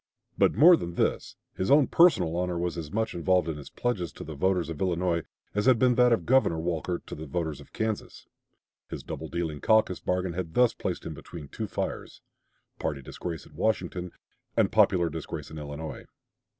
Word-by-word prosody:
But - - +3
more 175 +4 +8
than 85 - -5
this, - - -1 0.2
his 95 - -2
own 145 0 +6
personal 100 - +4
honor 90 0 -1
was 85 0 -2
as 80 -3 -6
much 110 +1 -1
involved 90 +1 +2
in 80 -2 -3
his 70 - -10
pledges 100 -10 -2
to - - -8
the 80 - -7
voters 90 +3 +1
of 75 - -7
Illinois 90 -2 +1 0.3
as 105 +3 0
had 130 -2 +6
been 125 +1 +4
that 125 0 +4
of 115 - +2
Governor 130 -10 +3
Walker 85 +1 -2
to - - -9
the 80 +1 -7
voters 80 -1 -3
of 70 - -16
Kansas. 110 -1 -4 0.6
His - - -6
double - - -6
dealing 80 -4 -3
caucus 110 -5 +3
bargain 90 -1 -1
had 85 -2 -5
thus 125 -2 +4
placed - - -4
him - - -4
between 75 -4 -10
two - - -4
fires - - -5 0.6
party 70 -2 -3
disgrace 80 +2 -6
at - - -18
Washington 90 -4 -1 0.5
and - - +3
popular 85 -2 +4
disgrace 80 -1 -6
in 80 - -7
Illinois. 75 +2 -7
90 Hz, 190 wpm, -28 LUFS, 80-110 Hz, 0.6 s, more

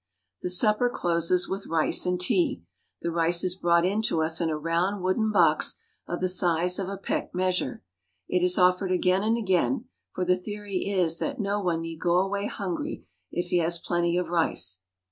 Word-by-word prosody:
The - - -2
supper 210 +6 +3
closes 175 -3 0
with 195 +1 -4
rice 165 +2 +2
and 180 0 0
tea. 180 - +1 0.4
The 170 - -1
rice 170 +1 +2
is 185 -1 +1
brought 170 -2 +2
in 200 +4 +1
to 160 - +1
us 160 +2 0
in 165 - +1
a 155 - -1
round 170 +5 -1
wooden 215 +4 +1
box - - +3 0.3
of 175 - -4
the 185 - +2
size 180 0 +1
of 190 -1 -3
a 200 - -5
peck 195 - -3
measure. 180 - -1 0.4
It 180 - +1
is 180 0 +4
offered 185 +1 +3
again 185 +1 +2
and 220 +2 +1
again; 180 - 0 0.3
for 180 - -2
the 180 0 +3
theory 205 0 -5
is 175 -4 0
that 280 -3 -3
no 205 0 -1
one 170 -3 0
need 165 -1 -7
go 175 -1 +1
away 200 +2 0
hungry 205 - -4 0.3
if 175 0 -3
he 180 - +3
has 170 +1 +1
plenty 175 0 0
of 180 -2 -1
rice. 95 - 0
180 Hz, 195 wpm, -26 LUFS, 170-195 Hz, 0.4 s, is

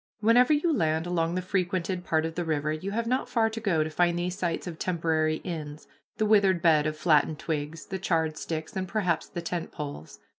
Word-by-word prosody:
Wherever 235 +5 +5
you 305 +1 +3
land 160 -4 +1
along 170 -1 0
the 185 - -1
frequented 185 -1 -1
part 160 -2 +1
of 165 - -3
the 175 - -2
river 155 -2 -1
you 155 +5 -4
have 230 +3 -1
not 255 +3 0
far 225 -2 +2
to 225 - -5
go 185 -8 +1
to 155 - -4
find 175 +2 +2
these 180 +1 -2
sites 175 -3 -2
of 170 -3 -7
temporary 160 -3 +1
inns, 155 -4 -6 0.3
the 215 - +1
withered 200 -4 +4
bed 155 -3 +4
of 155 0 -3
flattened 155 -1 +3
twigs, 155 0 -4
the 190 -1 -5
charred 160 -4 0
sticks, 160 0 -5
and 190 -1 -2
perhaps 180 -4 0
the 170 - -5
tent 170 0 -3
poles. 140 - -7
170 Hz, 215 wpm, -27 LUFS, 155-190 Hz, 0.3 s, Wherever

